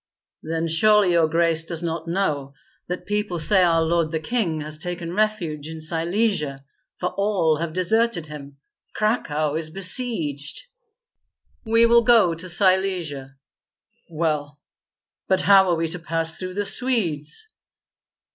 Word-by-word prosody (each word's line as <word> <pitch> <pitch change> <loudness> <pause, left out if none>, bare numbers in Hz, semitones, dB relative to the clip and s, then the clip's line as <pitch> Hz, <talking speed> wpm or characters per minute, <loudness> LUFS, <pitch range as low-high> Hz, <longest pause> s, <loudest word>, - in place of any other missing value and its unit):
"Then 165 +1 -3
surely 205 +3 +4
your 170 -2 +3
grace 165 0 +1
does 165 0 -5
not 165 -1 -4
know 150 -7 -2 0.3
that 180 0 -5
people 210 -3 -2
say 185 +4 +4
our 165 -2 +3
lord 165 -1 0
the 160 0 -2
king 165 -3 -2
has 155 0 -4
taken 175 0 -5
refuge 180 -8 -1
in 160 0 -8
Silesia, 165 -3 -1 0.3
for 180 - -2
all 190 -6 +1
have 165 +1 -4
deserted 185 0 +1
him. 145 -2 -11 0.4
Cracow 155 -9 -1
is 160 0 -2
besieged." 175 - -2 1.0
"We 230 +1 +4
will 235 0 +5
go 225 -7 +4
to 175 +3 -7
Silesia." 175 -7 +1 0.7
"Well, 150 -3 -2 0.7
but 190 -1 +2
how 195 -1 +5
are 175 - +2
we 165 0 -1
to 180 +2 -4
pass 165 0 0
through 185 0 -6
the 205 0 -2
Swedes?" 200 - -1
170 Hz, 135 wpm, -22 LUFS, 155-195 Hz, 1.0 s, will